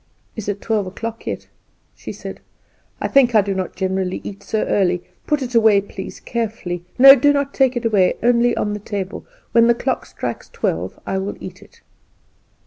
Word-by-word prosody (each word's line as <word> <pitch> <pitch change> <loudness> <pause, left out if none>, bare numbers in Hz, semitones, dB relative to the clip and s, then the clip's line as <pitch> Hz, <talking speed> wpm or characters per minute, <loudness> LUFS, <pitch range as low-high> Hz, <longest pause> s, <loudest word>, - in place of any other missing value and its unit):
"Is 215 -2 -5
it 200 0 -3
twelve 215 -4 0
o'clock 225 +4 -6
yet?" - - -4 0.5
she - - -8
said; - - -8 0.6
"I - - -1
think 250 -4 +4
I 215 - +7
do 200 0 -2
not 190 -2 -4
generally 190 -1 -1
eat 200 0 -8
so 215 +1 -1
early. 180 -3 +1 0.2
Put 295 -2 +1
it 250 -1 -6
away, 220 -3 +5
please, 195 -1 -8
carefully 215 -7 -4
no, 270 +2 +11
do 290 +2 +4
not 280 -1 -1
take 265 -2 +2
it 240 - -3
away 200 -5 +3
only 240 0 +3
on 210 - -1
the 210 - -4
table. 200 -2 -5 0.2
When 230 0 +5
the 235 - +4
clock - - -2
strikes - - -6
twelve - - -3
I 190 - -1
will 195 +1 -4
eat - - -9
it." - - -19
215 Hz, 190 wpm, -20 LUFS, 195-240 Hz, 0.6 s, no